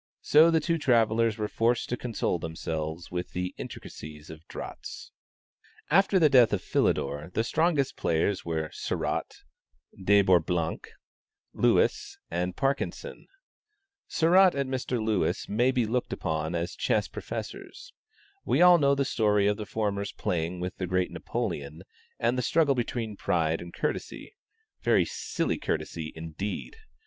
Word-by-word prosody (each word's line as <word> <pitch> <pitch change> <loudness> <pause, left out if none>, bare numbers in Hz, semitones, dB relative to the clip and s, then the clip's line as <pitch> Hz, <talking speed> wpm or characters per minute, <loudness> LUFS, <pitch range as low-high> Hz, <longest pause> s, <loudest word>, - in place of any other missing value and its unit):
So 155 +3 +6
the 165 -1 +3
two 165 +1 0
travellers 115 -4 +3
were 105 -1 -1
forced 115 +3 +1
to 125 - 0
console 115 -7 -2
themselves 80 0 -4
with 90 0 -4
the 90 0 -3
intricacies 75 0 -9
of 80 +1 -13
draughts. - - -8 0.8
After 195 +3 +4
the 165 -4 +6
death 125 -5 +6
of 95 - -1
Philidor, 75 +4 0
the 110 - +2
strongest 155 +1 +1
players 85 +4 0
were 80 -2 -3
Sarratt, - - -3 0.6
De 100 +1 +5
Bourblanc, 85 -2 +1 0.7
Lewis - - +2
and 90 +1 -2
Parkinson. 140 - -2 0.8
Sarratt 180 +2 +5
and 140 -1 -2
Mr. 125 -1 -2
Lewis 110 -3 0
may 120 +5 +2
be 125 -3 +1
looked 125 +3 -1
upon 80 0 -2
as 85 0 -2
chess - - +1
professors. - - -7 0.5
We - - +1
all 175 0 +8
know 140 -1 +4
the 140 0 0
story 105 -5 +2
of 105 0 +2
the 105 -2 -6
former's 100 -2 -2
playing 85 +1 -2
with 90 +1 -4
the 90 - -3
great 90 0 0
Napoleon, 75 +4 -4 0.3
and 120 +2 +1
the - - +1
struggle 150 +3 +3
between 115 -4 -3
pride 80 -1 0
and 85 0 -9
courtesy - - -4 0.5
(very - - +3
silly - - -2
courtesy, 80 -2 -3
indeed!) 80 - -5
105 Hz, 140 wpm, -28 LUFS, 85-130 Hz, 0.8 s, all